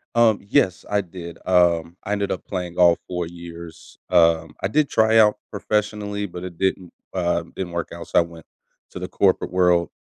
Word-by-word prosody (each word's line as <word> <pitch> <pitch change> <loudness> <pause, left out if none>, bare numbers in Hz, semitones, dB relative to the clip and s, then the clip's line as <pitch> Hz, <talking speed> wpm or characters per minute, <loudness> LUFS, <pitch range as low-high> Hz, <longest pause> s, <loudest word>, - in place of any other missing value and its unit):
Um, 115 -3 +4
yes 95 -9 +2
I 105 0 +2
did. 85 -2 -9
Um, 85 -2 +2
I 105 - -2
ended 100 -1 -1
up 90 - -4
playing 90 -3 -4
all 85 -1 +6
4 90 -2 -3
years. 85 -1 -11
Um, 85 -2 +3
I 95 - +1
did 150 +4 +2
try 110 0 +4
out 105 -1 +5
professionally, 105 0 -2
but 90 -2 -8
it 90 -2 -9
didn't 95 -1 -1 0.2
um, 85 -2 -1
didn't 90 -2 -4
work 85 -1 -3
out, - - -8
so, - - +3
I - - +6
went 85 -1 -8 0.5
to - - -7
the 90 - -4
corporate 95 -2 +1
world, 90 -2 +3
90 Hz, 190 wpm, -22 LUFS, 85-100 Hz, 0.5 s, all